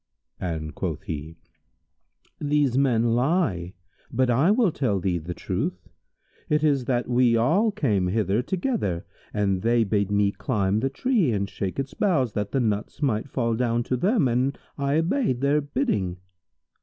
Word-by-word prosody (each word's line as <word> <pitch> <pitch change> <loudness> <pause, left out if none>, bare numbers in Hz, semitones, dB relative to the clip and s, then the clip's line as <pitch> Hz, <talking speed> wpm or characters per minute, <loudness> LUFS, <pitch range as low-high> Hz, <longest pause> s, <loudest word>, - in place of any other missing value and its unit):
and 80 -4 -4
quoth - - -4
he, 80 +1 -6 1.0
"These 145 -3 +1
men 120 -4 +2
lie; 120 - 0 0.4
but 125 +1 +2
I 135 +9 +3
will 215 -3 +3
tell 110 -10 0
thee 90 -2 0
the 85 +2 -6
truth. 90 -1 -3 0.6
It 150 0 +2
is 140 -5 +2
that 125 -1 0
we 120 -1 +3
all 180 - +3
came 105 - 0
hither 105 +2 +1
together 175 - -2 0.3
and 100 -3 0
they 115 +1 +3
bade 100 -1 0
me 100 -1 +2
climb 100 -5 0
the 135 - 0
tree 205 - +1
and 100 -2 -1
shake 95 -1 -4
its 135 0 -3
boughs 135 - +1
that 105 -1 -2
the 135 - +1
nuts 110 +3 -2
might 120 -1 0
fall 115 -3 0
down 120 0 0
to 125 - -1
them, 180 - +2
and 125 +3 0 0.2
I 140 0 0
obeyed 165 - +1
their 145 +2 +3
bidding." 140 - -1
120 Hz, 160 wpm, -25 LUFS, 100-145 Hz, 1.0 s, I